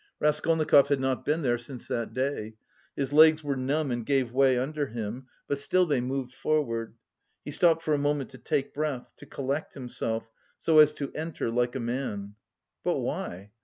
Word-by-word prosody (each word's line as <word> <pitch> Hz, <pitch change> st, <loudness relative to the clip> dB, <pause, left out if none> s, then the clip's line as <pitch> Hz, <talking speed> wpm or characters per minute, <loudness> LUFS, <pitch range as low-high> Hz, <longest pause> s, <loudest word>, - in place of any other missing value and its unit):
Raskolnikov 150 Hz, -1 st, +4 dB
had 140 Hz, -2 st, +1 dB
not 130 Hz, -1 st, -1 dB
been 155 Hz, +2 st, +1 dB
here 120 Hz, -2 st, +1 dB
since 125 Hz, +1 st, -9 dB
that 115 Hz, -2 st, -2 dB
day. 130 Hz, -3 st, -2 dB, 0.4 s
His 140 Hz, 0 st, -2 dB
legs 155 Hz, +1 st, +7 dB
were 145 Hz, -1 st, -1 dB
numb 135 Hz, +2 st, 0 dB
and 120 Hz, -1 st, -2 dB
gave 130 Hz, -1 st, +1 dB
way 135 Hz, -1 st, +4 dB
under 145 Hz, +3 st, -1 dB
him, 115 Hz, +3 st, -5 dB, 0.2 s
but 140 Hz, -, -1 dB
still 185 Hz, +6 st, +2 dB
they 145 Hz, -6 st, +1 dB
moved 130 Hz, 0 st, -3 dB
forward. 115 Hz, -9 st, -1 dB, 0.5 s
He 145 Hz, -, -5 dB
stopped 165 Hz, +1 st, +3 dB
for 155 Hz, -, +1 dB
a 145 Hz, -, +2 dB
moment 145 Hz, -2 st, 0 dB
to 130 Hz, -, -12 dB
take 135 Hz, +3 st, -1 dB
breath, 145 Hz, -4 st, -3 dB
to -, -, -13 dB
collect 140 Hz, +3 st, -3 dB
himself, 115 Hz, -3 st, -3 dB, 0.3 s
so 160 Hz, -1 st, +4 dB
as 150 Hz, 0 st, +7 dB
to 140 Hz, -, -5 dB
enter 155 Hz, -6 st, -3 dB
like 120 Hz, +2 st, 0 dB
a -, -, -1 dB
man. 115 Hz, -5 st, -3 dB, 0.5 s
"But -, -, +1 dB
why? 95 Hz, +4 st, -4 dB
135 Hz, 185 wpm, -28 LUFS, 120-150 Hz, 0.5 s, legs